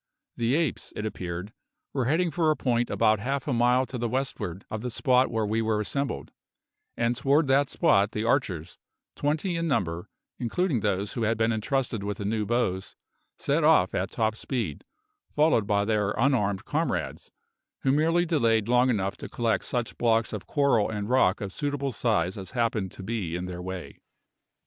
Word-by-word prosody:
The 120 +3 +1
apes, 160 -5 -1
it 105 - -4
appeared, 90 -1 -5 0.4
were 130 -3 0
heading 165 +6 +2
for 165 -2 +1
a 155 - +3
point 120 -3 0
about 110 -2 +3
half 135 +5 -2
a 140 - +1
mile 125 +2 +3
to 125 -1 -6
the 120 0 -1
westward 110 -8 -3
of 110 - -3
the 125 - -3
spot 130 +1 +2
where 110 -1 0
we 110 +2 0
were 110 -1 +1
assembled, 140 +6 -2 0.7
and 120 +1 +1
toward 140 +5 +3
that 135 +1 +4
spot 100 +1 +3
the 105 - -2
archers, 115 - -1 0.4
twenty 155 +5 -1
in 165 0 -1
number, 85 - -1 0.3
including 135 +3 0
those 100 +1 -1
who 120 - -3
had 110 0 +1
been 115 +1 +2
entrusted 115 0 -1
with 100 0 -3
the 100 - -5
new 105 0 -1
bows, 110 -6 -1 0.4
set - - 0
off - - +5
at - - -1
top 110 -1 0
speed, 115 - -4 0.5
followed 150 -9 +3
by 100 0 +2
their 105 -2 +1
unarmed 105 -7 +1
comrades, - - -2 0.5
who 135 - +2
merely 165 +4 +3
delayed 115 -10 +2
long 125 +1 +4
enough 100 -4 0
to - - -8
collect 115 -5 0
such 120 -2 -3
blocks 115 -1 +2
of 105 - -6
coral 140 -7 +2
and 105 -1 -4
rock 125 -7 +3
of 100 -2 -4
suitable 145 +2 -2
size 100 -5 0
as 95 - -8
happened 110 -5 0
to 95 - -10
be 95 -6 -3
in 90 +1 -3
their 90 -1 -6
way. 95 0 -7
115 Hz, 180 wpm, -27 LUFS, 105-135 Hz, 0.7 s, off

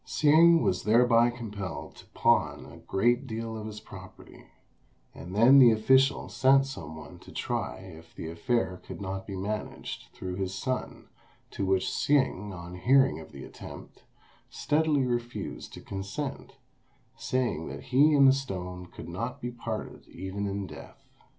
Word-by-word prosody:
Hsing 165 +2 +5
was 90 - +1
thereby 120 +1 +5
compelled 100 - -6
to - - -14
pawn - - +1
a - - -12
great 120 +6 +1
deal 115 -1 -4
of 110 -1 -6
his 105 -1 -7
property; - - -13 0.7
and 90 +3 -9
then 125 +6 +7
the 125 -3 +9
official 130 +5 +3
sent 135 +1 +4
some 135 -11 -8
one 80 - -11
to - - -14
try - - -3
if 85 -3 -13
the - - -6
affair 95 +2 -1
could - - -9
not 95 -1 -5
be 100 - -5
managed 105 +3 -5
through 90 0 -6
his 95 -1 -3
son, 130 +6 -4 0.4
to 100 - -3
which 95 0 +2
Hsing, 130 -8 +1
on 90 -1 -8
hearing 130 +3 +3
of - - -12
the - - -10
attempt, - - -11 0.5
steadily 150 -2 +1
refused 120 -1 -4
to - - -9
consent, 100 +9 -6 0.6
saying 125 -11 -1
that 70 +1 -7
he 145 +4 +4
and 140 -1 +7
the 135 - +7
stone 90 -9 -5
could - - -11
not 115 +10 -4
be 120 -2 -4
parted 115 -2 -6
even 95 +3 -5
in 100 0 -3
death. 75 -4 -12
110 Hz, 155 wpm, -28 LUFS, 95-130 Hz, 0.7 s, the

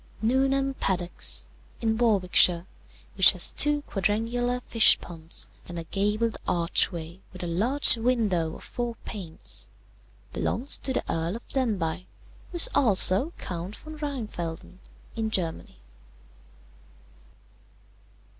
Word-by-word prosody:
"Newnham 270 +4 +1
Paddox, 180 -7 -1 0.3
in 220 -1 0
Warwickshire, 185 -6 +3 0.5
which - - +8
has - - +5
two 295 0 +3
quadrangular 230 +5 -1
fish 230 -2 +5
ponds 165 -1 -8 0.2
and 175 - -7
a 165 - -4
gabled 210 +6 -1
archway 170 0 +1
with 185 -1 -8
a - - -3
large 230 +11 +4
window 215 -9 0
of - - -11
four 240 -1 -5
panes, 180 -7 -5 0.6
belongs 265 +5 -1
to 270 - -1
the - - -1
Earl 165 +4 -2
of 235 - -10
Denbigh, 185 -9 -2 0.4
who - - -10
is 345 - +6
also 210 - +3
Count 180 +2 -6
von 310 0 -11
Rheinfelden, 210 - -6 0.4
in 225 -1 -2
Germany. 170 - -4
210 Hz, 115 wpm, -26 LUFS, 175-245 Hz, 0.6 s, which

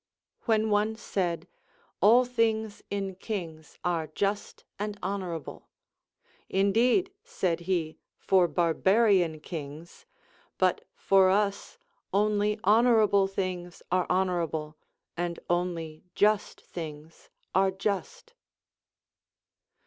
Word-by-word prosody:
When 220 -2 +2
one 210 +2 +2
said. 180 -6 -2 0.5
All 240 +4 +6
things 220 -3 0
in 195 -1 -3
kings 175 -6 -6
are 170 -3 0
just 200 +6 -3 0.2
and 210 0 -3
honorable, 185 -4 -5 0.4
— - - -36
Indeed, 235 - +2
said 175 -3 -1
he, 165 -4 -1 0.2
for 185 -2 +3
barbarian 175 +1 +2
kings; 160 - -8 0.5
but - - +1
for 195 - +4
us 200 +1 0 0.3
only 210 +1 +1
honorable 215 -2 +4
things 185 -2 -4
are 185 0 +2
honorable, 170 -4 -1 0.4
and 170 0 -3
only 170 -3 -2
just 210 0 +1
things 155 -1 -9 0.2
are 190 0 +4
just. 220 - -4
190 Hz, 95 wpm, -28 LUFS, 170-210 Hz, 0.5 s, All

